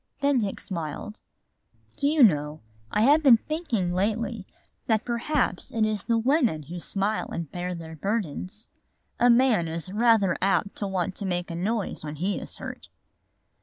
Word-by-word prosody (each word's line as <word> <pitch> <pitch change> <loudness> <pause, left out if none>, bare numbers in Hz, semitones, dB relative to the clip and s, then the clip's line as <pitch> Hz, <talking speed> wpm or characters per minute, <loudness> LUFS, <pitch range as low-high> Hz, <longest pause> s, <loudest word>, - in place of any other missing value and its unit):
Then 280 -2 +3
Dick 205 -3 -2
smiled. 170 +4 -6 0.8
"Do 280 - 0
you 300 -1 +4
know, 150 -6 +3 0.3
I 210 - +1
have 290 +5 +5
been 265 -6 +7
thinking 230 - -2
lately 215 +2 -1 0.4
that 220 -1 +1
perhaps 245 +5 -1
it 225 -2 +1
is 215 -2 -1
the 230 -1 +2
women 240 - +2
who 170 +5 -7
smile 200 +4 -1
and 165 -4 -5
bear 180 0 -4
their 160 -1 -8
burdens. 200 +2 -3 0.5
A 245 - +5
man 235 -8 +4
is 165 +3 -4
rather 220 -4 +4
apt 195 +1 +1
to 205 - -2
want 185 -1 -2
to 200 - -4
make 175 -1 -2
a - - -4
noise 200 +2 -2
when 150 0 -5
he 185 +6 -1
is - - -7
hurt." - - -8
205 Hz, 165 wpm, -26 LUFS, 175-235 Hz, 0.8 s, been